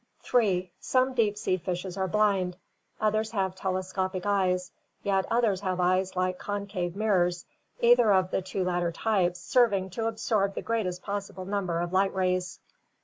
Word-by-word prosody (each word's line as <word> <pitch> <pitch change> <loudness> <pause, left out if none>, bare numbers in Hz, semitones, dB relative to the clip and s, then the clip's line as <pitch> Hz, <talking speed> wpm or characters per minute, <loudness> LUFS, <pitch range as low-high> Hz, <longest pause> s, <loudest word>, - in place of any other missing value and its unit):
3. 190 -7 +1
Some 260 0 +1
deep 215 -4 +1
sea 185 -3 0
fishes 180 +1 -4
are 190 -1 -1
blind, 190 -3 +1 0.4
others 215 0 +1
have 190 -3 0
telescopic 185 0 -2
eyes, 185 -3 +1 0.3
yet 195 -1 +1
others 225 -5 +2
have 185 -2 -2
eyes 185 +1 +1
like 185 0 0
concave 200 -3 -3
mirrors, 180 -5 +1 0.4
either 240 -2 +6
of 185 -1 +3
the - - 0
two 190 0 -3
latter 175 -1 0
types 180 -3 0
serving 200 -3 +2
to 225 +4 -2
absorb 215 -3 0
the - - -4
greatest 185 -6 -2
possible 200 -2 -5
number 185 -4 -1
of 175 +1 -3
light 195 +1 +2
rays. 185 -2 0
190 Hz, 155 wpm, -28 LUFS, 180-210 Hz, 0.4 s, either